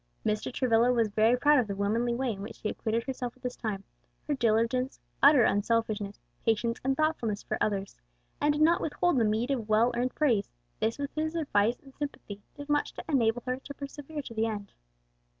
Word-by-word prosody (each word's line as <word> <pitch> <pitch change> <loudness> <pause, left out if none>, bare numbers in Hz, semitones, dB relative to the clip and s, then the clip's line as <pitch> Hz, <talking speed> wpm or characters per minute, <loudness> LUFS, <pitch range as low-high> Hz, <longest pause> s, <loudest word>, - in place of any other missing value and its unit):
Mr. 215 +2 0
Travilla 245 -1 +3
was 230 -3 +2
very 220 +4 +3
proud 290 +2 +5
of 240 - 0
the 200 - -3
womanly 225 +4 0
way 255 0 0
in 195 -2 -6
which 205 - -7
she 215 - -3
acquitted 230 +1 -1
herself 255 -2 -5
at 255 - -28
this 250 0 -3
time, 205 -4 -4 0.4
her 300 - +1
diligence, 240 +1 +1 0.2
utter 280 -3 +7
unselfishness, 210 -1 0 0.2
patience, 230 +1 +1
and 270 +1 +1
thoughtfulness 245 -10 0
for - - -2
others, 200 -2 -1 0.5
and 295 - +4
did 300 +1 +2
not 335 +2 +4
withhold 320 -1 +1
the - - +3
meed 220 +5 +1
of 230 -6 -2
well 225 +3 +4
earned 250 +2 -1
praise; 235 -10 +2 0.3
this 220 +1 0
with 285 0 -4
his 315 +1 -2
advice 240 -7 +2
and 270 -1 -15
sympathy 260 -9 -6 0.2
did 285 0 -8
much 295 -1 +1
to - - -6
enable 245 -5 +2
her 255 0 -1
to 280 +2 -10
persevere 290 +2 -7
to 235 - -8
the 225 0 +1
end. 205 -2 -5
240 Hz, 205 wpm, -29 LUFS, 220-275 Hz, 0.5 s, utter